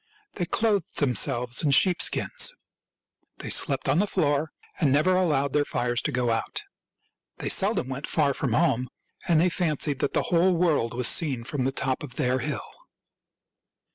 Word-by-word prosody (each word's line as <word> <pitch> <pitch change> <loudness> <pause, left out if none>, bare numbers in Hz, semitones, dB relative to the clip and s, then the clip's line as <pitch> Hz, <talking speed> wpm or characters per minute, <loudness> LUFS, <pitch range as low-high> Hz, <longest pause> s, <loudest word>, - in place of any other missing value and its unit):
They 175 - -3
clothed 210 -5 -1
themselves 125 -2 +1
in 150 - +1
sheep, 175 +6 +3
skins. - - +1 0.8
They - - -5
slept - - +2
on 165 - +2
the 205 - +1
floor, 155 -4 0 0.3
and 150 -6 +2
never 155 +7 +2
allowed 145 -7 0
their 150 - +2
fires 120 -3 -2
to - - -3
go 125 -1 0
out. 115 0 -2 0.7
They - - -4
seldom 125 - +2
went 135 +2 -6
far 145 -3 +1
from - - -2
home, 130 -6 +1 0.4
and 170 -3 +3
they 175 - +3
fancied 155 -5 -1
that - - -2
the - - +1
whole 175 +2 +3
world 155 -9 0
was 125 -1 +1
seen 135 -8 +2
from 140 +3 -4
the 130 +1 0
top 135 -1 -2
of 135 -5 -8
their 130 +1 0
hill. 140 -4 -4
145 Hz, 170 wpm, -25 LUFS, 125-170 Hz, 0.8 s, sheep